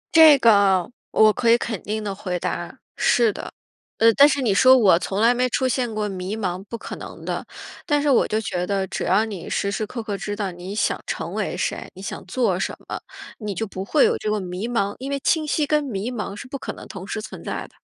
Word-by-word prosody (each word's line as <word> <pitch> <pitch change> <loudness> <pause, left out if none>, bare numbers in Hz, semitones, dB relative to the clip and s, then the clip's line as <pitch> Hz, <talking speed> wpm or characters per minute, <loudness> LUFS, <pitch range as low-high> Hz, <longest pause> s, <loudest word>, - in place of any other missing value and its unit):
这 315 -3 +9
个 200 -4 +4 0.2
我 215 -1 +5
可 240 -2 +1
以 235 - +7
肯 225 -4 -4
定 215 +1 -3
地 200 -2 -3
回 185 -2 -3
答， - - -4 0.2
是 230 -4 +3
的。 - - -7 0.5
呃， 230 0 +5
但 285 +5 +7
是 270 -1 0
你 210 -5 +2
说 260 +5 +7
我 190 -7 +5
从 195 +2 -3
来 235 +2 +5
没 250 +1 +1
出 260 +2 +1
现 245 -3 -1
过 210 -1 -1
迷 190 +2 -4
茫， 185 -2 -3
不 230 - -6
可 - - -7
能 - - -10
的。 - - -3 0.4
但 295 -1 +3
是 285 -1 +2
我 250 - +4
就 215 - 0
觉 180 -4 -3
得 195 -1 0
只 - - -4
要 200 +5 +3
你 200 -6 -7
时 200 0 -1
时 215 +1 -2
刻 230 -1 -6
刻 205 -2 -3
知 205 +1 -4
道 200 -3 -3
你 180 +3 -7
想 - - 0
成 - - -4
为 - - -2
谁， - - -3
你 190 - -10
想 - - -6
做 195 -5 0
什 - - -2
么， - - -5 0.4
你 210 -3 -4
就 225 - -2
不 190 -1 -6
会 280 +8 +3
有 - - +2
这 215 - -2
个 210 0 0
迷 185 +4 -4
茫， 205 -4 0
因 270 +2 -5
为 280 0 -1
清 310 -2 +2
晰 300 0 +1
跟 300 0 +1
迷 230 -2 -3
茫 210 -4 -4
是 260 - -9
不 275 +1 -6
可 - - -5
能 - - -11
同 190 -1 -8
时 215 - -3
存 215 - -9
在 - - -4
的。 - - -28
215 Hz, 270 characters per minute, -23 LUFS, 195-250 Hz, 0.5 s, 这